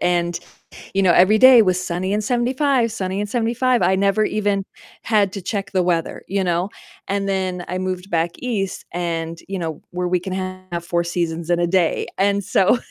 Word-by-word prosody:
and, 175 Hz, -1 st, 0 dB, 0.6 s
you 195 Hz, -, +2 dB
know, 185 Hz, -2 st, +5 dB
every 185 Hz, +5 st, +5 dB
day 255 Hz, 0 st, +8 dB
was 185 Hz, -2 st, +1 dB
sunny 185 Hz, +3 st, -2 dB
and 210 Hz, 0 st, 0 dB
75, 250 Hz, +1 st, +1 dB
sunny 190 Hz, -2 st, -3 dB
and 205 Hz, 0 st, -3 dB
75, 240 Hz, +1 st, +1 dB
I 185 Hz, +2 st, +3 dB
never 200 Hz, +2 st, +2 dB
even 205 Hz, -2 st, 0 dB, 0.4 s
had 205 Hz, -4 st, +1 dB
to 195 Hz, -, -5 dB
check 195 Hz, +1 st, -4 dB
the 185 Hz, -2 st, +2 dB
weather, 170 Hz, -2 st, -1 dB
you 195 Hz, 0 st, 0 dB
know, 175 Hz, +1 st, 0 dB, 0.4 s
and 200 Hz, 0 st, -1 dB
then 185 Hz, -2 st, -2 dB
I 180 Hz, -, -3 dB
moved 185 Hz, 0 st, -4 dB
back 165 Hz, 0 st, +1 dB
east 210 Hz, -7 st, -3 dB
and 165 Hz, -1 st, -3 dB
you 195 Hz, 0 st, -4 dB
know, 160 Hz, -4 st, -4 dB
where 180 Hz, 0 st, -2 dB
we 180 Hz, 0 st, +1 dB
can 185 Hz, +1 st, -5 dB, 0.4 s
have 170 Hz, 0 st, -4 dB
4 170 Hz, 0 st, 0 dB
seasons 170 Hz, -1 st, -3 dB
in 175 Hz, 0 st, +2 dB
a 175 Hz, -, +2 dB
day, 175 Hz, -2 st, +1 dB
and 200 Hz, +1 st, +2 dB
so 195 Hz, +7 st, +3 dB
190 Hz, 195 wpm, -21 LUFS, 175-205 Hz, 0.6 s, day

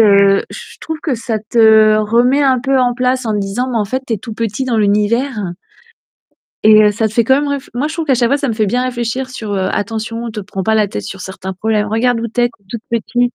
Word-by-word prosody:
heu, 200 Hz, -2 st, +5 dB
je -, -, -10 dB
trouve 320 Hz, -1 st, -5 dB
que 285 Hz, -6 st, -1 dB
ça 225 Hz, -1 st, -3 dB
te 220 Hz, -1 st, +4 dB
remet 240 Hz, +6 st, +2 dB
un 265 Hz, -2 st, +3 dB
peu 270 Hz, +1 st, +1 dB
en 245 Hz, -1 st, +2 dB
place 255 Hz, +1 st, 0 dB
en 220 Hz, -, -1 dB
disant, 205 Hz, +5 st, -2 dB
mais 235 Hz, -, 0 dB
en 210 Hz, -, 0 dB
fait 260 Hz, +5 st, -3 dB
tu 230 Hz, -, -3 dB
es -, -, -5 dB
tout 225 Hz, +1 st, -8 dB
petit 230 Hz, +3 st, -2 dB
dans 240 Hz, -3 st, -1 dB
l'univers. 210 Hz, 0 st, 0 dB, 1.1 s
Et 215 Hz, 0 st, +7 dB
heu, 210 Hz, -, +4 dB
ça 220 Hz, +1 st, 0 dB
te 215 Hz, -, -12 dB
fait 235 Hz, 0 st, +2 dB
quand 265 Hz, +4 st, +4 dB
même 290 Hz, +1 st, 0 dB
réf 280 Hz, -2 st, -4 dB
moi 270 Hz, +5 st, -1 dB
je 315 Hz, -, -6 dB
trouve 330 Hz, -1 st, -2 dB
qu'à 270 Hz, -, +3 dB
chaque 240 Hz, -1 st, +2 dB
fois, 280 Hz, -, +2 dB
ça 280 Hz, -, -2 dB
me -, -, 0 dB
fait 215 Hz, -1 st, 0 dB
bien 250 Hz, +5 st, 0 dB
réfléchir 250 Hz, +1 st, -3 dB
sur, 220 Hz, -5 st, -6 dB
heu: 190 Hz, -1 st, 0 dB
«Attention, 225 Hz, +3 st, -3 dB
te 215 Hz, -, -8 dB
prends 195 Hz, -1 st, -5 dB
pas 220 Hz, +3 st, +1 dB
la 215 Hz, -, +3 dB
tête 105 Hz, -, -5 dB
sur 185 Hz, -, -8 dB
certains 190 Hz, 0 st, -6 dB
problèmes. 210 Hz, +2 st, -1 dB
Regarde 230 Hz, +2 st, +1 dB
où 230 Hz, -, -3 dB
tu 240 Hz, +2 st, -2 dB
es! 240 Hz, -, +3 dB
Tu 220 Hz, -4 st, -25 dB
es -, -, -34 dB
toute -, -, -26 dB
petite, 240 Hz, +1 st, -1 dB
230 Hz, 270 wpm, -16 LUFS, 210-250 Hz, 1.1 s, Et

